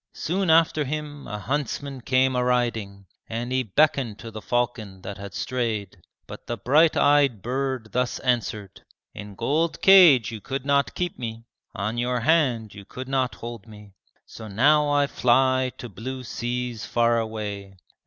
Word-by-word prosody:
Soon 185 +2 -1
after 160 -1 +4
him 145 0 -5
a 105 - -5
huntsman 135 +3 -3
came 130 +1 +2
a 125 - +1
riding, 115 -6 -1 0.2
And 120 +2 -4
he 130 0 +1
beckoned 130 -1 +1
to 115 0 -9
the 110 0 -8
falcon 110 -6 -2
that 100 +1 -7
had 100 0 -8
strayed, 110 -7 -3 0.2
But - - -11
the 120 - -3
bright 150 +9 +3
eyed 140 -8 +3
bird 130 -2 -2
thus 125 0 -1
answered: 110 -6 -2 0.3
"In 105 0 -9
gold 155 - 0
cage 170 - +7
you 110 -2 -7
could 135 +3 -5
not 140 0 +1
keep 175 -4 -3
me, 115 -1 -6 0.3
On 105 +5 -2
your 125 0 -1
hand 120 -7 +1
you 100 - -11
could 130 +6 -8
not 130 -2 0
hold 115 -2 -8
me, 105 -2 -14 0.3
So 110 - -10
now 145 +8 +3
I 145 0 +3
fly 130 0 +2
to 120 - -7
blue 125 +5 -7
seas 120 0 -4
far 115 0 +2
away. 105 -3 -5
125 Hz, 165 wpm, -24 LUFS, 110-135 Hz, 0.3 s, cage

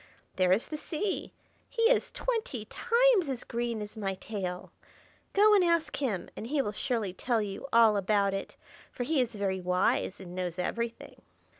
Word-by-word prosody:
There 185 -1 +3
is 195 +5 +2
the 305 - -3
Sea; 360 +6 -3 0.4
he 460 -2 -1
is 475 +2 +4
twenty 450 - -3
times 470 - +3
as 255 -2 -3
green 235 -2 -2
as 210 +2 -10
my 195 -3 -2
tail. 185 -3 -5 0.6
Go 420 +2 +6
and 400 -3 +6
ask 335 -3 +1
him, 235 -10 -2
and 225 - -6
he 290 +3 0
will 235 -6 0
surely 220 -4 -2
tell 235 +4 0
you 205 +5 -4
all 225 -2 +6
about 200 0 +2
it, 195 - -5 0.3
for 245 - -4
he 285 +1 +2
is 235 -2 -2
very 195 -2 -1
wise 180 +1 +1
and 180 -2 -9
knows 180 -1 -3
everything." 230 +6 -4
230 Hz, 175 wpm, -30 LUFS, 195-305 Hz, 0.6 s, Go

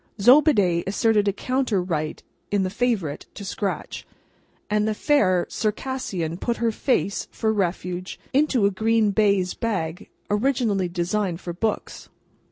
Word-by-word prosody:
Zobeide 205 - +5
asserted 210 +1 +2
a - - +4
counter 250 0 0
right 155 -4 -3 0.3
in 200 -1 +1
the 185 - -2
Favourite 205 - -1
to 200 - -7
scratch, 195 +1 -4 0.6
and 210 0 +1
the 215 - 0
fair 185 -11 +2
Circassian 210 -7 -3
put 235 +2 -1
her 230 -1 +1
face, 215 -3 0
for 220 -1 -1
refuge, 180 -2 -2
into 270 -6 +3
a 200 - +3
green 220 +1 +2
baize 200 -3 +2
bag, 190 -5 -3 0.2
originally 210 -4 +1
designed 175 +1 -1
for 175 -2 -6
books. 215 +5 -3
205 Hz, 135 wpm, -24 LUFS, 180-230 Hz, 0.6 s, Zobeide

